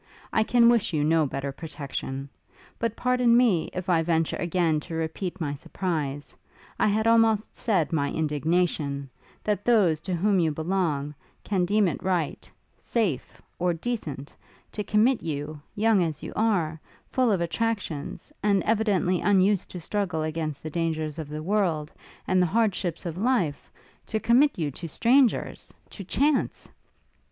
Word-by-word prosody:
I 220 - +3
can 235 +1 +4
wish 230 -5 +3
you 150 -2 +1
no 155 0 +3
better 135 +1 -4
protection. 140 -2 -6 0.5
But 230 -1 -1
pardon 250 -2 +3
me, 220 -10 +3
if 185 0 -5
I 170 -3 +3
venture 165 -1 +1
again 170 -3 +1
to 165 +2 -7
repeat 165 +4 -3
my 145 -4 -2
surprise 145 -2 -4 0.4
I - - +3
had 215 +1 +1
almost 225 -2 +3
said 180 - 0
my 140 -3 +1
indignation 150 -2 -1 0.3
that 205 -2 -1
those 190 -10 +3
to 180 +1 -2
whom 195 +2 +2
you 165 -2 +2
belong, 155 -3 -1 0.3
can 190 -3 0
deem 205 +2 +3
it 160 - -3
right 180 -5 -2 0.3
safe 200 - -2 0.2
or 175 -1 +1
decent, 160 - -5 0.4
to 210 - -4
commit 220 +5 +3
you 150 -1 -4
young 215 -2 +3
as 160 -4 -2
you - - -6
are, 175 -8 +1 0.3
full 255 -3 +2
of 195 - +2
attractions, 195 - -3
and 200 -2 +2
evidently 205 -5 +1
unused 200 -1 +3
to 180 - -7
struggle 180 -2 -2
against 155 -2 -3
the 155 - -5
dangers 160 -2 -2
of 155 -2 -6
the 155 +1 -5
world, 170 -6 0 0.3
and 185 0 +3
the 180 - +3
hardships 195 -5 0
of 170 -1 -4
life, 205 - 0 0.4
to 220 - -1
commit 260 +6 +4
you 155 -4 -1
to 165 +5 -7
strangers 245 - +2 0.2
to 200 - -8
chance! 280 - 0
175 Hz, 155 wpm, -26 LUFS, 155-215 Hz, 0.5 s, can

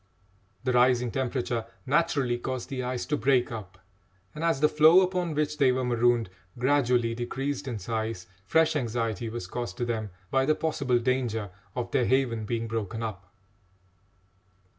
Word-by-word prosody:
The 130 -1 0
rising 125 -1 +3
temperature 125 -2 -1 0.2
naturally 140 -4 +1
caused 130 0 -4
the 130 -2 -3
ice 125 0 -3
to 150 - 0
break 125 +1 +2
up, 105 -5 -7 0.6
and 155 - -6
as 165 -4 +2
the 150 - +5
floe 155 +4 +6
upon 180 -3 -1
which 150 0 -1
they 135 -2 +5
were 130 0 0
marooned 120 -2 +2 0.3
gradually 125 -3 +2
decreased 135 +4 -3
in 120 -4 -3
size, 110 -1 -3 0.2
fresh 160 +8 +3
anxiety 115 -4 -1
was 115 -4 -5
caused 120 +6 -5
to 120 - -1
them 110 -3 -2 0.2
by 135 0 +2
the 155 - +4
possible 140 -6 0
danger 120 -5 -1 0.2
of 125 - -3
their 125 - +2
haven 120 -4 +1
being 115 +1 -2
broken 110 0 -3
up. 100 -4 -6
125 Hz, 160 wpm, -27 LUFS, 115-140 Hz, 0.6 s, floe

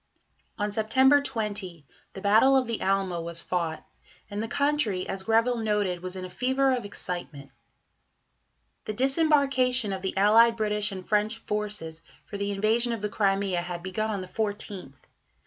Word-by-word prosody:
On 205 0 -1
September 260 +7 +4
20 205 - -4 0.3
the 195 - -8
Battle 220 +7 +5
of 260 - +2
the 230 -1 -4
Alma 190 -3 0
was 170 0 -2
fought, 170 -3 -3 0.5
and 205 +1 -3
the 225 - -3
country, 280 -8 0
as 195 0 -3
Greville 230 +4 +2
noted, 205 -5 -1
was 185 +1 -5
"in 185 -1 -5
a - - -8
fever 260 +5 +1
of 245 -4 -2
excitement." 175 -8 -6 1.3
The 215 - -3
disembarkation 265 -4 +2
of 190 - -5
the 190 0 -4
allied 230 +3 +5
British 210 -1 +1
and 185 -2 -8
French 215 +1 +1
forces 210 -7 -4 0.2
for 200 - -7
the 200 0 -2
invasion 220 +4 +1
of 220 -3 -5
the 210 - -1
Crimea 195 -3 0
had 175 0 -6
begun 215 +4 -2
on 205 -3 -2
the 185 - -7
14th. 200 -6 -4
210 Hz, 165 wpm, -27 LUFS, 190-230 Hz, 1.3 s, Battle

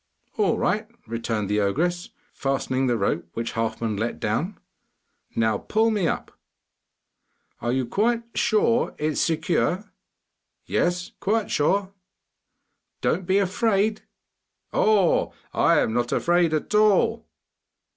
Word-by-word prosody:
'All 210 -3 +2
right,' 210 +4 0 0.2
returned 115 -3 -2
the 105 +1 +1
ogress, 175 - 0 0.2
fastening 135 -1 -1
the 120 -2 +1
rope 100 -4 -1
which 115 0 -3
Halfman 115 -1 -2
let 115 +3 -2
down. 140 - -1 0.8
'Now 110 -1 +1
pull 220 +1 +1
me 205 -6 +1
up.' - - -3 1.3
'Are 120 - -1
you 130 -1 0 0.5
sure 230 +2 +2
it 150 - -3
is - - -1
secure?' 175 +4 0 0.7
'Yes, 175 0 0
quite 215 +2 0
sure.' 195 +6 +1 1.1
'Don't 180 -1 0
be 190 - +3
afraid.' 200 +2 +1 0.7
'Oh, 205 -5 +3 0.2
I - - +4
am 110 - 0
not 120 0 0
afraid 175 -1 +2
at 155 - -3
all! 215 +2 +3
175 Hz, 115 wpm, -24 LUFS, -, 1.3 s, I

